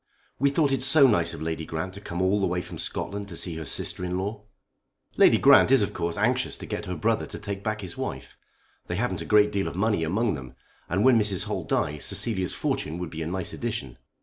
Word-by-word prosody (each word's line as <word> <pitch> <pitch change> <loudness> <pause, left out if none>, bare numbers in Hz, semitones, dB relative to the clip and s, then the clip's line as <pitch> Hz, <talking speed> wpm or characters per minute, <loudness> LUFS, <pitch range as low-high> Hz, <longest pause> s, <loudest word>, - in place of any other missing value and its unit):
"We 140 +2 +3
thought 140 0 +2
it 135 -2 0
so 135 +2 +6
nice 95 -10 +3
of 75 - -7
Lady 80 0 -3
Grant 80 +4 -4
to 100 - -8
come 85 -2 -3
all 100 +2 +2
the - - +2
way 90 0 -1
from - - -9
Scotland 100 0 -3
to 85 -4 -8
see 85 -3 -2
her 80 - -6
sister 90 - -3
in 90 0 -2
law." 105 +2 -4 0.7
"Lady - - +6
Grant - - +6
of 115 -8 +3
course 85 0 -2
is 105 - -1
anxious 125 +3 +1
to - - -8
get - - -5
her 90 - -3
brother 110 +3 0
to - - -6
take 100 -1 -6
back 110 0 -2
his 95 -3 -7
wife. 65 -2 -6 0.5
They 90 - -3
haven't 95 -5 -2
a - - -5
great 105 -1 +4
deal 100 -1 -1
of - - -5
money 100 -2 +1
among 100 +6 0
them, 65 -4 -8 0.3
and 95 +5 +1
when 130 -3 +6
Mrs. 105 -3 +2
Holt - - -4
dies 75 0 0
Cecilia's 95 -6 0
fortune 80 - -2
would 90 -2 -5
be 80 - -6
a 80 - -3
nice 95 +2 -2
addition." 115 - -4
95 Hz, 240 wpm, -26 LUFS, 85-110 Hz, 0.7 s, so